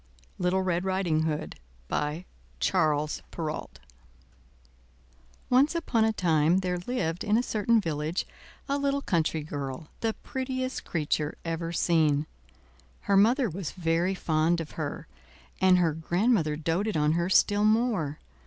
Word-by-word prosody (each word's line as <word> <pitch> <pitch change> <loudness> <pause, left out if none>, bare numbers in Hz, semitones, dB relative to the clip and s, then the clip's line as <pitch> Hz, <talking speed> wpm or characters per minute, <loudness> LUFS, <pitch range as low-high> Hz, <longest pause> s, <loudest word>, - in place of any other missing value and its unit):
LITTLE 185 +1 +1
RED 180 -1 0
RIDING 185 -5 +1
HOOD 155 0 -3 0.3
By 150 - -2 0.3
Charles 155 -4 +1
Perrault 155 -2 -5 1.7
Once 270 +6 +4
upon 235 -9 +1
a 220 - +2
time 170 -2 +2
there 180 -1 -1
lived 175 -5 -2
in 210 +1 +2
a 240 - +2
certain 225 0 +2
village 160 -1 -2 0.4
a 280 0 0
little 280 0 0
country 160 -3 0
girl, 145 0 -6
the 225 -1 -1
prettiest 260 0 -3
creature 150 -2 -1
ever 165 0 -3
seen. 155 -4 +2 0.8
Her 200 - +1
mother 235 +6 +4
was 185 -3 -5
very 175 +2 0
fond 160 0 +1
of 160 -2 -6
her, 155 -3 -5 0.6
and 185 -1 +6
her 170 -3 +2
grandmother 170 0 +1
doted 165 +6 -1
on 150 0 +3
her 170 +2 0
still 205 +2 +4
more. 215 - +1
175 Hz, 135 wpm, -28 LUFS, 155-210 Hz, 1.7 s, and